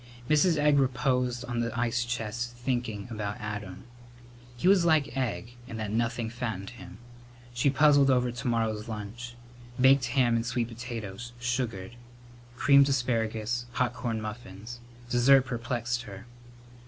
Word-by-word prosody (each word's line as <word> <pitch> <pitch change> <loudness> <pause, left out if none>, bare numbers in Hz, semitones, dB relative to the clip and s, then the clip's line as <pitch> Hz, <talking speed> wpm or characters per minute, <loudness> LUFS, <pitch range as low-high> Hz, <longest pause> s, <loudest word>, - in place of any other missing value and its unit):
Mrs. 155 +3 +4
Egg 145 -1 +4
reposed 125 -2 0
on 120 -1 -3
the 115 0 -2
ice 120 0 +1
chest 120 0 -4
thinking 120 -4 -3
about 105 -2 -4
Adam. 105 -3 -6 0.7
He 120 - 0
was 190 -2 +6
like 155 -4 +2
Egg, 120 -2 -3
in 115 - -7
that 110 -2 -3
nothing 115 +1 -1
fattened 110 -4 -4
him. 110 -5 -11 0.6
She 120 +4 +2
puzzled 145 0 +5
over 125 -2 +2
to 125 +3 -5
morrow's 110 -2 0
lunch. 115 +3 -7 0.4
Baked 130 0 +5
ham 120 -1 +2
and 115 - +1
sweet 120 0 -1
potatoes, 120 -1 -7
sugared; 120 -4 -3 0.6
creamed 140 +2 +5
asparagus; 120 -2 -1
hot 125 -1 0
corn 115 -2 -3
muffins. 110 +1 -8 0.3
Dessert 125 +2 +5
perplexed 120 -1 -2
her. 100 -3 -10
120 Hz, 140 wpm, -28 LUFS, 110-125 Hz, 0.7 s, was